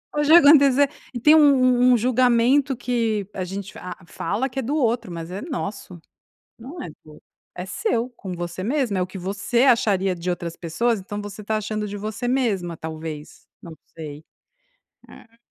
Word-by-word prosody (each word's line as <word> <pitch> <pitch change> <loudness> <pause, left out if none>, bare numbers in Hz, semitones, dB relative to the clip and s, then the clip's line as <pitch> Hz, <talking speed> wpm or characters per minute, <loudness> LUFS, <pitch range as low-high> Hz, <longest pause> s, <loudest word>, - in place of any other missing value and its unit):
Hoje 295 0 +1
vai 340 - +10
acontecer 280 -2 +6 0.2
e 240 - -4
tem 300 +6 +6
um 315 - +7
um 255 -3 +5
um - - +4
julgamento 255 +3 +3
que 230 -5 -1
a 185 - -3
gente 195 +2 -6
fa 180 -1 -8
a 180 - -18
fala 205 +10 -2
que 270 - -5
é - - 0
do 270 +5 -2
outro, 235 - 0
mas 165 0 -6
é 190 +3 -6
nosso, 205 - -6 0.6
não 280 +9 -9
é - - -7
do 150 - -17 0.2
outro, - - -18 0.3
é 180 - -5
seu 250 - -1
com 195 -6 -8
você 175 +1 -5
mesmo. 245 -3 0
É - - +1
o 180 - -2
que 185 - -11
você 205 +6 -1
acharia 200 -7 +3
de 175 +1 -6
outras 170 -1 -3
pessoas, 220 +7 -1
então 205 +2 -6
você 205 +1 -8
tá 215 +1 -1
achando 215 0 -3
de 205 - -6
você 215 +4 -4
mesma, 200 -10 0
talvez. 160 -1 -8 0.2
Não 165 -2 -10 0.2
sei. 150 -1 -8 0.9
É. 230 -1 -17
215 Hz, 195 wpm, -23 LUFS, 180-255 Hz, 0.9 s, vai